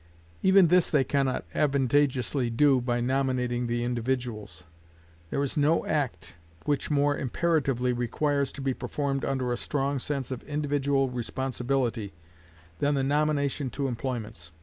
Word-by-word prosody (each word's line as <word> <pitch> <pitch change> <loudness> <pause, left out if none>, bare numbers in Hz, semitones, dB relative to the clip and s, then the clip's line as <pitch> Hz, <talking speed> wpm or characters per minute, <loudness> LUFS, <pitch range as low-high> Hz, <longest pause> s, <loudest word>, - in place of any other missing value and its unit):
Even 190 -2 +6
this 180 0 +4
they 145 -3 +3
can 140 +1 +1
not 130 - -2
advantageously 135 -2 +1
do 130 +2 +4
by 120 0 0
nominating 125 -1 0
the 120 0 -1
individuals. 120 -5 -3 0.7
There 140 - 0
is 140 - -3
no 150 +3 +3
act 135 - -2 0.3
which 145 -2 0
more 145 -1 +2
imperatively 135 -4 0
requires 140 +4 0
to 140 - -7
be 135 -1 0
performed 135 +2 -2
under 130 -2 -1
a - - -2
strong 140 +1 -1
sense 135 -1 -3
of 130 - -4
individual 140 -2 0
responsibility 125 -3 -2 0.7
than 145 0 +2
the 135 - +1
nomination 145 -1 +1
to 135 +3 -2
employments. 115 - -5
135 Hz, 140 wpm, -27 LUFS, 125-145 Hz, 0.7 s, Even